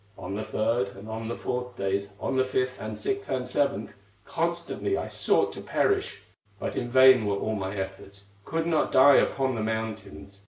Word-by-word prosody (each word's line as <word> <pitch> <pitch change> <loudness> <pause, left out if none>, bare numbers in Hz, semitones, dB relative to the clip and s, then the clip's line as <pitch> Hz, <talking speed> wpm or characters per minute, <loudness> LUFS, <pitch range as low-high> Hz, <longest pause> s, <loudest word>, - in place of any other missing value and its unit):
"On 90 +1 -6
the 105 +2 -3
third 110 -1 0
and 100 +2 -11
on 110 0 -5
the 120 - -3
fourth 125 0 -4
days, 100 -1 -1
On - - -2
the 130 - +4
fifth, 130 0 -2
and 110 0 -5
sixth, 200 - -3
and 130 -1 -2
seventh, 125 -6 -1 0.3
Constantly 170 - -2
I - - -3
sought - - +1
to - - -8
perish; 400 -1 0 0.4
But - - -4
in 120 - -2
vain 130 -3 +6
were 100 -1 0
all 110 - -2
my 95 -1 -3
efforts, 95 +1 -7 0.2
Could 165 +8 -2
not 165 -2 +1
die 135 +1 +7
upon 135 -1 +1
the 115 - -3
mountains. 110 -3 -5
110 Hz, 190 wpm, -27 LUFS, 100-130 Hz, 0.4 s, die